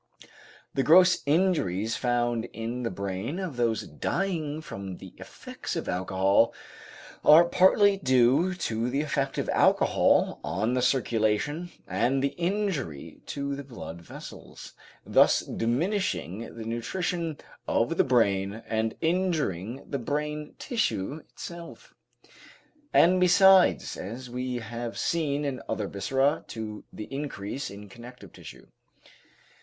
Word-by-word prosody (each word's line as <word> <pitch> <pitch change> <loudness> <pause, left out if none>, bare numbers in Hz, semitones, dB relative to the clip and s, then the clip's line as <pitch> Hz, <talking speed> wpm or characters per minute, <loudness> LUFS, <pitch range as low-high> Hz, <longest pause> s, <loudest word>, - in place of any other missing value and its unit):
The 135 - +1
gross 180 +5 +6
injuries 140 - +1
found 120 -2 0
in 115 +2 -4
the 115 - -1
brain 100 - -4
of 185 -7 -4
those 115 -2 0
dying 165 -5 -2
from 95 - -7
the - - -12
effects - - -7
of - - -4
alcohol 95 +4 +2 0.7
are 160 +3 +8
partly 195 +3 +4
due 130 +5 +3
to 115 -7 -2
the 135 +3 0
effect 140 -2 -2
of - - -1
alcohol - - +3
on 110 +6 -1
the 125 - +1
circulation 125 +5 0 0.2
and 120 +8 +1
the 140 - +2
injury 175 - -3
to 140 0 -3
the 140 - -7
blood 115 -10 -9
vessels, - - -11 0.3
thus - - +4
diminishing 115 - -2
the 110 - -6
nutrition 160 +7 -2 0.3
of 120 +9 +1
the - - +5
brain 105 -4 +1
and 110 0 -1
injuring 155 - -1
the 140 - -3
brain 150 +3 -3
tissue 150 - -2
itself, 170 - -10 1.0
and 180 +2 +5
besides, 190 +1 +5
as 120 +6 -7
we 125 0 -3
have 120 0 -5
seen 150 -3 0
in 135 -2 -3
other 105 - -1
viscera, 135 +9 0
to 110 -2 -7
the 105 - -7
increase 135 -4 -4
in 100 +1 -10
connective 120 -2 -13
tissue. - - -12
130 Hz, 125 wpm, -27 LUFS, 110-160 Hz, 1.0 s, are